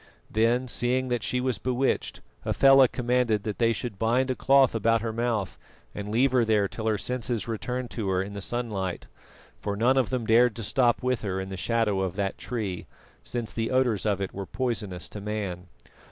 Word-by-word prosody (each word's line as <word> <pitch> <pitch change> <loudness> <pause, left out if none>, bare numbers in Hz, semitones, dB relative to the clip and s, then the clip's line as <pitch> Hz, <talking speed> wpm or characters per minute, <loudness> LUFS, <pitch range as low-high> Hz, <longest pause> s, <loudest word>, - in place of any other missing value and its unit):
Then, 120 +4 +2
seeing 125 +1 0
that 120 -2 0
she 125 - -1
was 125 -4 -1
bewitched, 130 +1 -1 0.2
Hafela 135 -1 +6
commanded 120 -4 0
that 105 -2 -4
they 115 -1 +4
should 110 -2 -4
bind 125 +4 +2
a - - -1
cloth 135 -1 +4
about 115 0 +2
her 115 -1 -2
mouth 115 -4 -2 0.3
and 105 0 -6
leave 125 +5 +3
her 125 -2 +3
there 105 -3 +2
till 110 +3 -5
her 110 -1 +2
senses 120 0 -3
returned 125 +2 -3
to 105 -5 -3
her 95 -1 +1
in 100 +1 -8
the 100 - -6
sunlight 100 -5 -3 0.5
for 100 +10 -3
none 125 +6 +3
of 130 -4 +2
them 125 -3 -2
dared 115 0 +4
to 115 - -5
stop 120 +3 +2
with 125 -1 0
her 95 -3 -2
in 95 0 -5
the 95 - -5
shadow 105 0 0
of 95 -1 -2
that 100 -1 -2
tree, 105 -8 -4 0.3
since 115 - -5
the 115 0 -1
odours 125 -5 +1
of 100 -2 +1
it 95 -1 -4
were 100 -1 -6
poisonous 105 -7 -3
to 105 - -8
man. 100 -4 -4
115 Hz, 200 wpm, -27 LUFS, 100-125 Hz, 0.5 s, Hafela